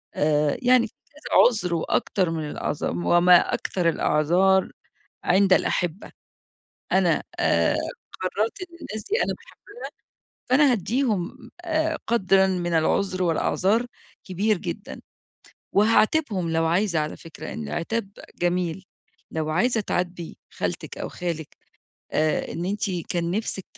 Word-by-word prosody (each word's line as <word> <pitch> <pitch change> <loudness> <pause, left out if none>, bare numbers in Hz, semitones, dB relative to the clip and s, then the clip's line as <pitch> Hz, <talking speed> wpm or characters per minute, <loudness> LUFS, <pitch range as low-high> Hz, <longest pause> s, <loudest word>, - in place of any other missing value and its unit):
آآ 150 -1 +2
يعني 250 -2 +4
كذا 295 +7 -2
عذر 200 -8 -1
وأكتر 175 +2 0
من 155 -2 -3
الأعذار - - -2
وما 175 - +4
أكثر 175 -3 0
الأعذار 175 +5 +2 0.5
عند 190 +1 +4
الأحبة. 175 0 0 0.8
أنا، - - +3 0.2
آآ، - - +3 0.4
قررت 210 - -2
إن 345 -2 -9
الناس 215 -4 -6
دي 430 - +1
أنا - - -2
باحبها، - - -19 0.8
فأنا 275 +1 +5
هادِّيهم 225 0 -1
آآ 320 -2 0
قدرًا 195 -4 +3
من 175 -2 -1
العذر 185 +3 +1
والأعذار 190 +7 +1 0.4
كبير 200 +3 0
جدًا. - - -6 0.7
وهاعاتبهم 215 - +2
لو 165 0 +1
عايزة 175 0 +1
على 150 0 -2
فكرة، 165 -2 -10
لإن 75 -2 -6
العتاب 195 - -3 0.3
جميل، 175 +1 -1 0.5
لو 155 -1 -2
عايزة 230 +7 +2
تعاتبي 175 -3 -3
خالتك - - -4
أو - - -4
خالك 165 -4 -5 0.6
آآ 155 0 0
إن 170 - -4
أنتِ 200 0 -1 0.2
كان 170 -1 -1
نفسك 195 -1 -3
185 Hz, 120 wpm, -24 LUFS, 170-220 Hz, 0.8 s, فأنا